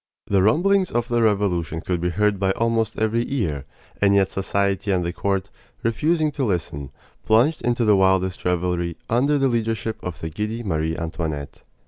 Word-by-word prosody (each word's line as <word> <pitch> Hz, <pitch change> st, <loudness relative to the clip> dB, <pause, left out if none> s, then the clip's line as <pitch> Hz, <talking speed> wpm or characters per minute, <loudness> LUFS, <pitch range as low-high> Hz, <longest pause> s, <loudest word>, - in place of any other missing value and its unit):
The 100 Hz, -2 st, +2 dB
rumblings 185 Hz, -, +3 dB
of 120 Hz, +1 st, -1 dB
the 120 Hz, -1 st, +2 dB
Revolution 95 Hz, -7 st, +1 dB
could 90 Hz, 0 st, -2 dB
be 90 Hz, -, 0 dB
heard 105 Hz, +2 st, +1 dB
by 95 Hz, -1 st, +1 dB
almost 115 Hz, -1 st, 0 dB
every 110 Hz, +2 st, +1 dB
ear; 80 Hz, -, -1 dB, 0.4 s
and 100 Hz, -1 st, +4 dB
yet 95 Hz, -1 st, +3 dB
society 100 Hz, +1 st, -1 dB
and 90 Hz, -3 st, +1 dB
the 85 Hz, -, -2 dB
court, 95 Hz, 0 st, -2 dB, 0.3 s
refusing 155 Hz, +7 st, +1 dB
to 145 Hz, -, -3 dB
listen, 80 Hz, -, -2 dB, 0.3 s
plunged 125 Hz, +9 st, +3 dB
into 120 Hz, -1 st, +1 dB
the 105 Hz, -1 st, +5 dB
wildest 95 Hz, -1 st, +2 dB
revelry 90 Hz, -1 st, -1 dB
under 140 Hz, +5 st, +3 dB
the 135 Hz, -1 st, +2 dB
leadership 115 Hz, -3 st, -1 dB
of 90 Hz, -4 st, -5 dB
the 80 Hz, -, -5 dB
giddy 110 Hz, +5 st, -3 dB
Marie 80 Hz, -4 st, -1 dB
Antoinette. 80 Hz, -3 st, -4 dB
100 Hz, 170 wpm, -22 LUFS, 90-115 Hz, 0.4 s, the